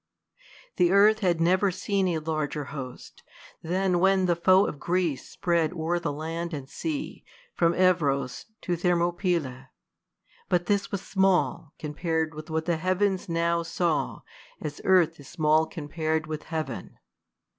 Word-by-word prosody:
The 175 - +4
earth 210 +2 +5
had 180 -5 +1
never 185 +4 +3
seen 190 +1 0
a 170 -2 0
larger 155 -2 -2
host, 130 -4 -8 0.4
Than 180 +1 +1
when 190 0 +3
the 175 -1 +2
foe 185 +3 +5
of 145 - -5
Greece 170 -4 -1
spread 170 -1 0
o'er 170 +1 -1
the 165 -3 -2
land 165 +3 -4
And 135 -2 -7
sea 295 - -5 0.3
from 170 -1 +2
Heb^ 170 -7 +3
us 125 - -9
to 175 - -1
Thermopylae; 170 -6 0 0.8
But 175 -1 +2
this 200 0 0
was 200 -1 -3
small, 190 -5 +1
c 155 - -5
onjpar'd 160 +1 -1
with 155 +1 -9
what 160 0 -1
the 170 -2 +1
heavens 185 +2 0
Now 170 0 +1
saw, 165 -1 -1 0.4
as 145 -1 -6
earth 175 -4 +4
is 140 - -12
small 155 -1 +2
compar'd 155 +1 -2
with 155 0 -6
heaven. 160 -1 -5
170 Hz, 150 wpm, -27 LUFS, 155-185 Hz, 0.8 s, earth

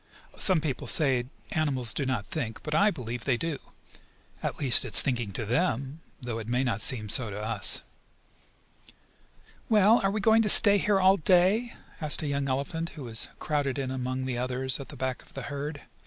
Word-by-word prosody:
Some 185 -5 +3
people 145 -5 -4
say 130 -6 +4 0.3
animals 130 -7 -1
do 140 +1 -3
not 125 -6 -2
think, 115 -4 -6
but 150 - -5
I 200 +7 +4
believe 125 - -6
they 130 -3 +1
do. 165 +1 -4 0.8
At - - -4
least 135 -5 +7
it 125 - -5
is - - +7
thinking 120 -6 -2
to 110 - -3
them, 135 - -2 0.2
though 120 -2 -5
it 110 - -8
may 125 +2 0
not 115 -5 -2
seem 110 -5 0
so 110 +2 +1
to 100 +1 -7
us. 110 +2 0 1.9
"Well, 215 +1 +4
are 195 - +2
we 210 +2 -2
going 220 +2 +3
to 215 - 0
stay 205 0 +7
here 205 -1 +1
all 190 +1 +4
day?" 190 +7 +2 0.3
asked 155 +1 +2
a - - -3
young 140 -1 -2
elephant, 160 +6 -3
who 145 - -7
was 115 -3 -3
crowded 145 -3 -2
in 135 -2 -3
among 130 0 -4
the 125 -2 -3
others 130 +1 -1
at 140 - -9
the - - -10
back 130 -1 -4
of - - -21
the 135 - -6
herd. 145 +1 -6
135 Hz, 200 wpm, -27 LUFS, 125-165 Hz, 1.9 s, least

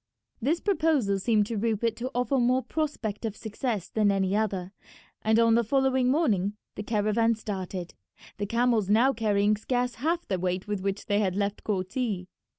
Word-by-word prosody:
This 305 +8 +1
proposal 310 - +1
seemed 210 0 +2
to 225 +1 -4
Rupert 225 +1 0
to 250 +2 -3
offer 250 +3 +1
more 250 +2 +2
prospect 285 -10 -3
of 220 -2 -3
success 220 -2 -3
than 210 -2 +2
any 195 0 +1
other, 195 -4 -1 0.5
and 220 +1 +2
on 230 0 +5
the 235 +1 +4
following 260 +1 +2
morning 215 - +2 0.2
the - - -6
caravan 215 +2 +1
started, 190 -4 -5 0.5
the 205 - -2
camels 230 -3 +1
now 240 +6 +4
carrying 210 -2 +2
scarce 245 +2 -1
half 335 +4 0
the 190 -2 -1
weight 185 +2 -2
with 205 -2 -2
which 195 +1 -3
they 205 -2 +1
had 190 -3 0
left 200 0 -2
Korti. 195 0 -2
220 Hz, 170 wpm, -27 LUFS, 200-245 Hz, 0.5 s, on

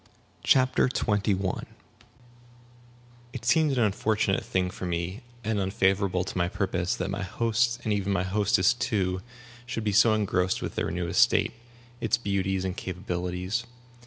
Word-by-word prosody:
CHAPTER 130 -1 +4
XXI 105 -5 +1
LISTLESS 95 - -2 1.7
It 120 -3 -7
seemed 155 +3 +3
an 120 - +4
unfortunate 105 -1 +1
thing 90 -1 -1
for 90 - -5
me, 85 +5 -3 0.2
and 110 -2 0
unfavorable 95 -1 +1
to - - -7
my 85 - +2
purpose, 95 -1 -1
that 90 - -3
my 100 - -3
host, 115 +4 0
and 110 - 0
even 100 -1 -1
my 95 -2 +1
hostess 100 +3 +3
too, 95 -6 -1 0.5
should 115 -3 -3
be 105 - +1
so 110 +2 +5
engrossed 95 -3 +1
with - - -4
their - - -1
new 90 0 -2
estate, 85 - +3 0.5
its - - +1
beauties 95 -3 -1
and 95 -1 -2
capabilities. 90 +4 -3
100 Hz, 150 wpm, -27 LUFS, 90-110 Hz, 1.7 s, so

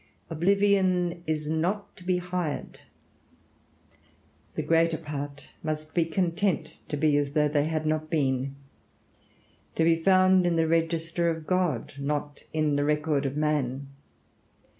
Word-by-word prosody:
Oblivion 185 0 +2
is 155 -1 -1
not 175 +7 -1
to 180 - -14
be 180 0 +1
hired. 180 -3 -4 1.8
The - - -1
greater 165 0 +3
part 145 -2 -6
must 155 0 -4
be 170 -2 +2
content 170 -1 -1
to 150 - -2
be 150 0 +3
as 145 -1 -1
though 150 0 +3
they 145 0 +1
had 155 0 -2
not 155 0 -1
been; 135 -4 0 1.2
to 165 - +2
be 165 0 +4
found 185 0 +5
in 170 - +1
the 165 -1 +2
register 165 +1 +1
of 160 -1 -3
God, 180 -10 0
not 145 +1 -3
in 155 -2 +1
the 145 - +1
record 150 -1 +1
of 135 +2 -4
man. 140 -3 -1
160 Hz, 140 wpm, -27 LUFS, 150-175 Hz, 1.8 s, found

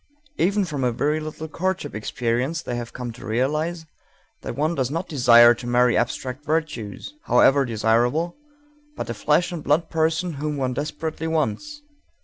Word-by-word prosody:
Even 200 +2 +2
from 145 -6 -3
a 125 - +2
very 150 +6 0
little 155 +1 -6
courtship 185 -1 -3
experience 120 +7 -2
they 120 -1 -3
come 125 -2 -6
to 115 - -13
realize 155 +9 -1 0.6
that - - -5
one 155 +4 0
does 130 -6 -1
not 165 +5 -3
desire 120 -4 +7
to 120 +1 -8
marry 120 0 +3
abstract 130 +3 -2
virtues, 150 - -3
however 135 0 +4
desirable, 120 +8 +1 0.6
but - - -4
a - - -2
flesh 150 - +1
and 170 -4 -5
blood 150 +4 +1
person 165 +2 0
whom 150 -1 -2
one 130 -2 -1
desperately 155 +3 -4
wants. 165 - -2
145 Hz, 155 wpm, -23 LUFS, 120-160 Hz, 0.6 s, desire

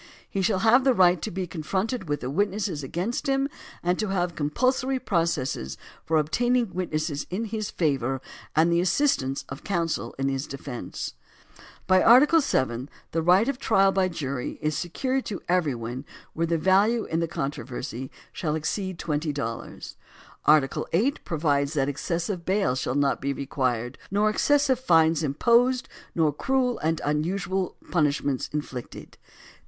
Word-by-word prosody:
He 195 - -2
shall 190 +1 +2
have 245 +4 +6
the 260 -2 +4
right 180 -3 +5
to - - -3
be 185 +1 -3
confronted 185 - -3
with 145 - -1
the 125 - -3
witnesses 195 -2 -1
against 180 - -3
him 270 0 +2 0.4
and 180 +1 +1
to 215 - 0
have 180 -3 0
compulsory 255 - 0
processes 165 - -1 0.3
for 160 - +1
obtaining 240 +9 +1
witnesses 155 -4 -2
in 200 +6 -2
his 215 -1 -3
favor 135 -5 0 0.4
and 165 +2 +4
the 170 - +3
assistance 180 - +1
of 135 - -8
counsel 170 -4 -2
in 135 0 0
his 135 +1 -2
de 135 - -6
fence. 130 -3 -6 0.7
By 185 0 +5
Article 285 +8 +7
VII 130 - 0 0.2
the 165 - 0
right 180 +7 +4
of 275 -2 -1
trial 195 -6 +4
by 190 -1 +2
jury 140 -7 -4
is 155 0 -1
secured 260 - -1
to 200 - -4
every 175 -7 +2
one 120 +4 -6 0.3
where 165 +1 0
the 165 0 +1
value 200 +7 +3
in 165 - -1
the 165 - 0
contro 140 -4 -3
versy 125 +1 -6 0.2
shall 155 -3 -2
exceed 185 +4 -2
twenty 150 -1 -1
dollars. 125 -6 -6 0.5
Article 150 -3 +3
VIII 220 +12 +3
pro 165 - -3
vides 145 -2 +1
that 135 -3 +1
excessive 170 +5 -2
bail 190 -5 +1
shall 130 0 -2
not 140 -1 +1
be 140 +1 -1
required, 130 -3 -2
nor 210 +2 +2
excessive 280 +2 +2
fines 165 - +4
imposed, 235 - +3 0.3
nor 155 -3 +2
cruel 255 - 0
and 160 +1 0
unusual 180 +5 -1 0.2
punish 150 -4 +2
ments 135 -3 -1
inflicted. 140 -5 -6
170 Hz, 160 wpm, -26 LUFS, 145-205 Hz, 0.7 s, Article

